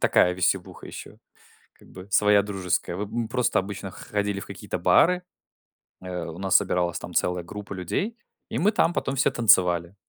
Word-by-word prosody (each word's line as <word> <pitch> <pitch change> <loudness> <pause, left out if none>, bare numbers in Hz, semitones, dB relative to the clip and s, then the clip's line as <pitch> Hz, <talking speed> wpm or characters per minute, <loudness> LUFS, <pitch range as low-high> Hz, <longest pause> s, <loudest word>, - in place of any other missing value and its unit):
такая 90 - +4
веселуха 90 0 -1
еще, - - -10 0.6
как - - -21
бы, 90 +1 -12
своя 105 0 +5
дружеская. 95 -3 -2
Вы 105 - -2
м, - - -12
мы 115 -2 -2
просто 125 -4 +1
обычно 95 0 -5
ходили 100 +1 -3
в - - -8
какие-то - - -6
бары, 180 +1 +4 0.8
э, 90 -2 -5
у 85 0 -8
нас 95 -1 +4
собиралась 90 -1 0
там - - -9
целая 90 -1 0
группа 100 +3 -8
людей, 100 - -3 0.3
и - - -3
мы 210 +5 +3
там 175 -5 +2
потом 135 - -2
все 130 - +2
танцевали. 90 -6 +3
100 Hz, 180 wpm, -25 LUFS, 90-110 Hz, 0.8 s, своя